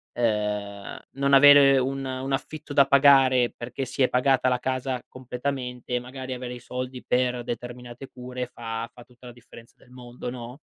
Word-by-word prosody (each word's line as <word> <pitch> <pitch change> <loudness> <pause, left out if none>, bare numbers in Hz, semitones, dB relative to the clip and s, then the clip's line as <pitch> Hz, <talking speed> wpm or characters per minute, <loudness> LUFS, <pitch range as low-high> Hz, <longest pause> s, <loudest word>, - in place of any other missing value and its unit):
ehm, 105 -3 -2 0.2
non 140 0 0
avere 140 -1 +8
un 135 +1 -2
un 130 +1 -4
affitto 145 +2 -5
da 140 -1 +6
pagare 135 -3 +5
perché 125 +3 -6
si 130 +2 -1
è 125 - +3
pagata 130 0 +2
la 125 -1 +1
casa 130 0 -3
completamente 125 -1 -5
e - - +1
magari 130 +1 -7
avere 125 -1 -6
i 125 - -8
soldi 125 +1 -6
per 125 -1 0
determinate 120 +2 -7
cure 125 0 -6
fa 115 -2 -6
fa 120 0 -14
tutta 125 0 -20
la 120 - -9
differenza 115 -1 -16
del 125 - -23
mondo, 125 -1 -8
no? 120 +1 -8
125 Hz, 175 wpm, -25 LUFS, 120-135 Hz, 0.2 s, avere